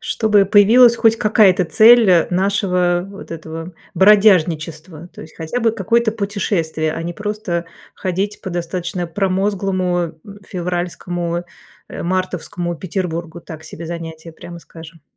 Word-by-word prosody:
Чтобы 210 -3 +2
появилась 235 +4 +6
хоть 225 0 +3
какая-то 205 -5 +3
цель, 225 +1 +6
э, 170 -2 +4
нашего, 180 -2 0
вот 200 -3 -12
этого, 165 +1 -7 0.2
бродяжничества. 170 -4 +2
То - - -11
есть 155 - -15
хотя 165 +10 -4
бы 225 -1 +2
какое-то 225 +2 +1
путешествие, 190 -7 -2
а 165 - -5
не 175 +1 -4
просто 205 -5 -4 0.3
ходить 195 +3 -3
по 190 - -5
достаточно 175 +1 -4
промозглому 185 -2 -1 0.3
февральскому, 175 -1 -4 0.4
а, - - -7
мартовскому 180 -1 -3
Петербургу. 170 -2 -5
Так 160 -1 -11
себе 160 +1 -9
занятие, 165 -1 -8
прямо 170 +2 -11
скажем. 165 -2 -14
180 Hz, 125 wpm, -18 LUFS, 170-200 Hz, 0.4 s, появилась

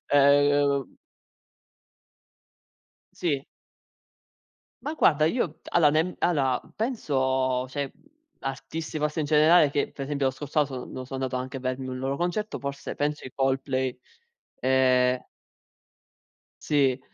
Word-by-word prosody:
ehm 145 -1 +3 2.2
Sì. 145 -6 -1 1.4
Ma, 305 - -3
guarda, 155 - +4
io 170 -5 -1
allora, 160 -4 +5
nem 160 +4 +1
allora, 135 -7 +2 0.2
penso, 130 - 0
cioè, 140 0 -3 0.5
artisti, 135 +4 -5
forse, 150 +2 -1
in 150 - 0
generale, 155 +1 +5
che, 145 - -1
per 135 - -6
esempio, 140 -1 -1
lo 130 - +1
scorso 145 +3 -1
anno, 145 - +1 0.3
so 130 - -5
sono 135 - -9
andato 130 - -3
anche 130 +1 -3
a - - -5
vedermi 130 0 -3
un 130 - -4
loro 135 +1 -2
concerto- 180 +6 -2
forse, 140 0 -5
penso, 150 +1 -2
i 130 - -8
Coldplay, 130 -1 0 0.6
ehm 130 -1 +3 1.4
Sì. 135 -3 +2
140 Hz, 125 wpm, -26 LUFS, 130-150 Hz, 2.2 s, allora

